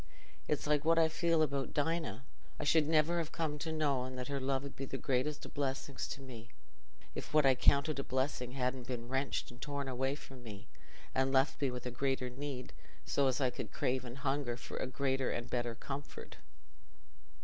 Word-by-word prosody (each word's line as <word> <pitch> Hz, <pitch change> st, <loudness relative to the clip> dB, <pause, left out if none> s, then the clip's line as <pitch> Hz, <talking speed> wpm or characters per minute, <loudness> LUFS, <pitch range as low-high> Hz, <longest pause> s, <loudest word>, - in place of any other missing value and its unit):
It's 150 Hz, -, 0 dB
like 150 Hz, -1 st, +3 dB
what 165 Hz, +1 st, +4 dB
I 165 Hz, -1 st, +6 dB
feel 165 Hz, 0 st, +3 dB
about 140 Hz, -2 st, -1 dB
Dinah. 150 Hz, -6 st, 0 dB, 0.4 s
I -, -, -1 dB
should 150 Hz, 0 st, +4 dB
never 165 Hz, +2 st, +4 dB
ha' 160 Hz, -, -10 dB
come 155 Hz, -3 st, -1 dB
to 160 Hz, +2 st, -2 dB
know 140 Hz, -5 st, +1 dB
that 125 Hz, 0 st, -4 dB
her 140 Hz, -1 st, 0 dB
love 135 Hz, +1 st, 0 dB
'ud 140 Hz, -, -7 dB
be 135 Hz, -, -4 dB
the 135 Hz, -, -4 dB
greatest 135 Hz, +4 st, 0 dB
o' -, -, -7 dB
blessings 140 Hz, -1 st, -2 dB
to 140 Hz, -, -5 dB
me, 120 Hz, -3 st, -9 dB, 0.6 s
if 150 Hz, -, -5 dB
what 155 Hz, -2 st, +7 dB
I 135 Hz, -, +7 dB
counted 140 Hz, +3 st, +4 dB
a -, -, 0 dB
blessing 130 Hz, -2 st, -1 dB
hadn't 125 Hz, -1 st, -1 dB
been 120 Hz, -2 st, -3 dB
wrenched 135 Hz, 0 st, 0 dB
and 120 Hz, -, -14 dB
torn 140 Hz, -1 st, -2 dB
away 130 Hz, +2 st, 0 dB
from 135 Hz, -3 st, -11 dB
me, 105 Hz, -4 st, -8 dB, 0.5 s
and 130 Hz, 0 st, +2 dB
left 135 Hz, +2 st, +3 dB
me 140 Hz, -, +3 dB
with 125 Hz, 0 st, -5 dB
a 125 Hz, -, -2 dB
greater 130 Hz, 0 st, 0 dB
need, 135 Hz, -1 st, -5 dB, 0.3 s
so 140 Hz, -1 st, +3 dB
as 130 Hz, 0 st, +1 dB
I 130 Hz, -3 st, +3 dB
could -, -, -5 dB
crave 130 Hz, 0 st, 0 dB
and 120 Hz, +1 st, -7 dB
hunger 135 Hz, -3 st, 0 dB
for -, -, -7 dB
a -, -, -1 dB
greater 135 Hz, 0 st, +1 dB
and 120 Hz, -, -2 dB
a -, -, -14 dB
better 120 Hz, -2 st, 0 dB
comfort." 140 Hz, +4 st, -6 dB
135 Hz, 205 wpm, -35 LUFS, 125-145 Hz, 0.6 s, what